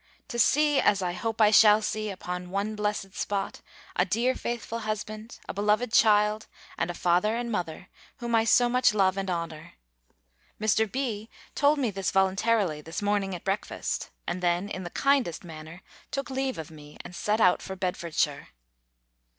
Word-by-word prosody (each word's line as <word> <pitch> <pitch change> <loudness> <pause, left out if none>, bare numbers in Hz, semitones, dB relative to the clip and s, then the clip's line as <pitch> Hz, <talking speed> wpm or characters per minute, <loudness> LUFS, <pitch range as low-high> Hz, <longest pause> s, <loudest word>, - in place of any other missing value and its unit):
To 235 - -3
see, 295 +4 +4
as 200 -2 +3
I 175 -1 -1
hope 225 +4 -3
I 210 -1 +6
shall 215 -1 +7
see, 215 0 -2
upon 180 -2 -5
one 200 +3 -2
blessed 210 -2 -2
spot, 200 -1 -3 0.3
a 180 - +3
dear 230 +7 +1
faithful 235 -2 -4
husband, 215 +1 -5
a - - -4
beloved 210 +4 +1
child, 210 -1 +4 0.3
and - - -1
a 175 - -4
father 180 +6 +2
and 235 0 -3
mother, 180 -3 -4 0.3
whom 235 -1 -4
I 225 -1 +4
so 245 +2 +5
much 250 -3 +3
love 190 -2 +3
and 195 -1 -3
honour! 165 -2 -4 0.9
Mr. 215 0 +2
B. 230 -5 -3 0.2
told 290 +1 +3
me 255 -6 0
this 195 -2 -2
voluntarily, 190 -3 +1
this 160 +6 -6
morning 200 -2 0
at 175 - -9
breakfast; 195 +2 -3 0.2
and 180 +1 -3
then, 175 +3 +1
in 185 - -5
the 175 - -5
kindest 270 - +1
manner, 160 +1 -10 0.3
took 275 -1 -4
leave 265 0 -1
of 160 -1 -7
me, 150 -1 -13
and 180 - -9
set 210 +4 0
out 180 -5 +4
for 190 - -6
Bedfordshire. 170 -5 -1
205 Hz, 175 wpm, -27 LUFS, 180-225 Hz, 0.9 s, shall